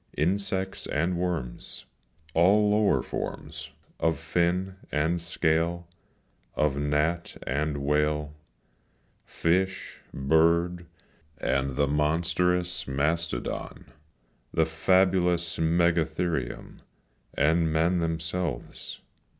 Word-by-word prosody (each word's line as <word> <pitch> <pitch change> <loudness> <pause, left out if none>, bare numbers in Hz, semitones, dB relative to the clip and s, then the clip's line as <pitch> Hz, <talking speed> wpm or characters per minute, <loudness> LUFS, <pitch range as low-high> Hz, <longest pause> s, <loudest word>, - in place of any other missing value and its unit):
Insects 95 +3 -1
and 85 +4 0
worms, 85 -8 -4 0.5
All 105 +5 +4
lower 105 0 +3
forms - - -5 0.3
Of 80 -1 +1
fin 90 +4 0
and 80 +3 +1
scale, 85 +1 0 0.7
Of 75 -3 +1
gnat 75 +4 0
and 70 +3 -1
whale, 75 +1 0 0.9
Fish, 95 +3 -1
bird, 85 +4 +2 0.5
and 65 0 0
the 70 - +3
monstrous 85 +4 0
mastodon, 75 0 -2 0.6
The 80 - +2
fabulous 90 +1 +2
megatherium, 80 -4 0 0.6
And 80 +3 +2
men 85 +3 +2
themselves. 80 -3 -3
80 Hz, 80 wpm, -27 LUFS, 75-90 Hz, 0.9 s, All